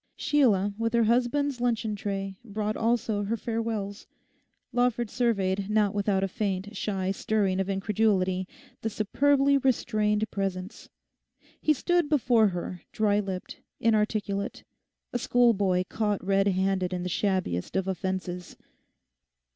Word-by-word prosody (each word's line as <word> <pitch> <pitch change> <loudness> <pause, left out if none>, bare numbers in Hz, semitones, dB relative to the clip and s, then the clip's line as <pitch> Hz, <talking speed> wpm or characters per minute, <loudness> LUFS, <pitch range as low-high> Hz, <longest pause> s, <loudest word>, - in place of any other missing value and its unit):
Sheila, 210 -9 +2
with 230 0 0
her 235 - +4
husband's 250 +3 +1
luncheon 230 -3 0
tray, 195 -1 -3
brought 215 -1 -3
also 225 -2 0
her 225 +3 -1
farewells. 225 -3 -3 0.7
Lawford 245 -2 +1
surveyed, 200 -5 0
not 210 -2 +2
without 200 -1 +1
a - - +1
faint, 200 0 -3
shy 190 -1 -1
stirring 195 -2 0
of 195 0 -1
incredulity, 190 -2 +1 0.3
the 225 - -1
superbly 275 +6 +2
restrained 215 -4 +1
presence. 195 0 -4 0.7
He 310 - +4
stood 345 +2 +1
before 240 -7 +4
her 180 -1 -4
dry 210 -1 +2
lipped, 190 -3 -5 0.2
inarticulate, 210 -2 0 0.5
a 245 - 0
schoolboy 205 -7 +3
caught 210 -4 -1
redhanded 190 -1 +1
in 180 -1 -2
the - - -2
shabbiest 185 - -1
of 190 0 0
offences. 185 -1 -4
205 Hz, 125 wpm, -27 LUFS, 190-230 Hz, 0.7 s, her